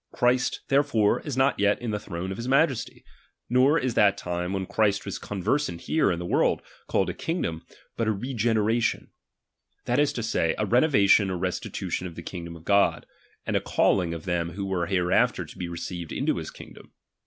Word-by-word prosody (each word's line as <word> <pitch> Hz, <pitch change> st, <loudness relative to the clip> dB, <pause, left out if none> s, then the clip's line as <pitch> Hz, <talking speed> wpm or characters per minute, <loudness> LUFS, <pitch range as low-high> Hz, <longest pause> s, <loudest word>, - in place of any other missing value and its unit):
Christ 125 Hz, +1 st, +1 dB
itc. -, -, -43 dB
therefore 135 Hz, -7 st, +3 dB
is 145 Hz, -4 st, -5 dB
not 135 Hz, +1 st, +2 dB
yet 100 Hz, 0 st, +3 dB
in 120 Hz, -2 st, -3 dB
the 105 Hz, -, -2 dB
throne 90 Hz, 0 st, -5 dB
of 95 Hz, -, -5 dB
his 115 Hz, -, -5 dB
majesty; 135 Hz, -1 st, +1 dB, 0.5 s
nor 130 Hz, +5 st, +5 dB
is 130 Hz, -5 st, -1 dB
that 100 Hz, -2 st, +4 dB
time, 90 Hz, 0 st, -3 dB
when 95 Hz, -1 st, -2 dB
Christ 100 Hz, 0 st, +1 dB
was -, -, -4 dB
conversant 100 Hz, -, -2 dB
here 160 Hz, -11 st, +2 dB
in 85 Hz, -, -1 dB
the 90 Hz, -, -5 dB
world, -, -, +1 dB, 0.2 s
called 95 Hz, -2 st, +1 dB
a -, -, -8 dB
kingdom, 85 Hz, -, -3 dB, 0.4 s
but 115 Hz, -, 0 dB
a -, -, +3 dB
regenera 115 Hz, 0 st, 0 dB
tion; 115 Hz, -, -1 dB, 0.7 s
that 120 Hz, +3 st, +1 dB
is 145 Hz, -1 st, +3 dB
to 120 Hz, -, -3 dB
say, 85 Hz, -7 st, 0 dB
a 105 Hz, -, 0 dB
renovation 105 Hz, -4 st, +4 dB
or 90 Hz, -, -2 dB
restitution 90 Hz, 0 st, -3 dB
of 85 Hz, -, -10 dB
the 85 Hz, -, -8 dB
kingdom 85 Hz, -2 st, -7 dB
of 80 Hz, -, -13 dB
God, 100 Hz, -1 st, +3 dB, 0.4 s
and -, -, -1 dB
a -, -, +2 dB
calling 90 Hz, -4 st, +2 dB
of 80 Hz, -, -8 dB
them 85 Hz, -2 st, -1 dB
who 100 Hz, +2 st, -4 dB
were 90 Hz, -3 st, -1 dB
hereafter 90 Hz, -1 st, +2 dB
to -, -, -13 dB
be 90 Hz, -, -5 dB
received 85 Hz, 0 st, -6 dB
into -, -, 0 dB
his -, -, -5 dB
kingdom. -, -, -13 dB
100 Hz, 200 wpm, -26 LUFS, 90-120 Hz, 0.7 s, nor